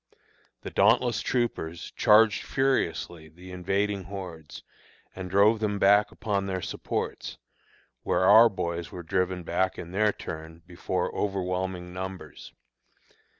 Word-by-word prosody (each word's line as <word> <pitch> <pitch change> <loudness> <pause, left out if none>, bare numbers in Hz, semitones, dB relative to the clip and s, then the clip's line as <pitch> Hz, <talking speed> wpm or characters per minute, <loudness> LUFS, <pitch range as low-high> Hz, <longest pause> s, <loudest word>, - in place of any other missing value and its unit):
The - - -7
dauntless 120 +4 +3
troopers 85 -10 -2
charged 105 0 +4
furiously 85 -11 -1
the 90 +3 -13
invading 95 +2 -1
hordes, 85 -7 -8 0.5
and 95 -1 -6
drove 100 +4 +4
them 105 -2 -1
back 100 +1 +4
upon 100 -3 -2
their 95 -1 -2
supports, - - -4 0.6
where - - 0
our 110 +4 +8
boys 85 -4 -4
were 90 - -8
driven 90 +1 -1
back 95 +3 -1
in 85 - -8
their 105 +2 +2
turn 80 -2 -9
before 90 +1 -3
overwhelming 90 -2 -3
numbers. 95 0 -8
95 Hz, 120 wpm, -27 LUFS, 90-105 Hz, 0.6 s, our